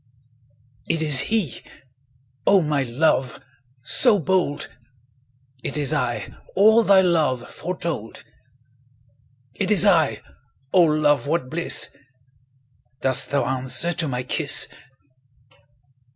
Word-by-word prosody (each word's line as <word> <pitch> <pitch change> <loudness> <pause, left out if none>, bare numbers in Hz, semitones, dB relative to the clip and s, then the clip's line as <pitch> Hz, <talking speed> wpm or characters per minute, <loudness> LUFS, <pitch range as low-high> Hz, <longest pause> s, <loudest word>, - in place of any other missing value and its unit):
It 160 -1 0
is 150 -4 +5
he—O 130 - -3
my 150 -2 -1
love! 130 +1 -1 0.4
So 230 - +3
bold! 180 -4 -1 1.0
It 140 - -4
is 150 0 +1
I—all 195 - +1
thy 200 -3 +4
love 155 -9 0
Foretold! 170 - -6 1.3
20 - - -1
It - - -4
is 205 -5 +5
I—O 135 +8 -1
love, 150 -3 +1
what 145 -5 -2
bliss! 170 -2 0 1.1
Dost 130 -1 +1
thou 140 -1 0
answer 130 +6 0
to 165 -1 -3
my 125 -2 -4
kiss? 145 +3 +2
150 Hz, 95 wpm, -21 LUFS, 130-175 Hz, 1.3 s, is